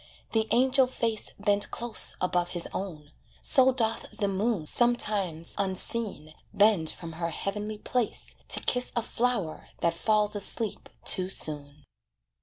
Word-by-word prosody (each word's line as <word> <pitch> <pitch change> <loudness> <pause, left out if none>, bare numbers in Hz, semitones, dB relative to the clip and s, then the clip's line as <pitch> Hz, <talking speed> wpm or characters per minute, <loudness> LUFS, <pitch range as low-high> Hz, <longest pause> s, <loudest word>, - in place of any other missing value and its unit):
The 220 -1 +1
angel 260 +1 +4
face 230 -3 -2
Bent 205 0 +1
close 235 -1 0
above 180 -1 0
his 170 - -2
own. 155 -6 -6 0.3
So 265 -2 +7
doth 230 -3 0
the 205 -2 0
moon 195 -2 -1
Sometimes, 200 -7 0
unseen, 195 -4 0 0.2
bend 200 -6 +3
from 165 -1 -5
her 165 +1 -3
heavenly 210 +5 -4
place, 245 +1 -3
To - - +2
kiss 250 0 0
a 235 - 0
flower 225 -11 -2
that 170 0 +2
falls 210 +4 +1
asleep 205 +2 -1 0.2
too 185 0 +4
soon. 145 -4 -3
205 Hz, 135 wpm, -28 LUFS, 170-230 Hz, 0.3 s, So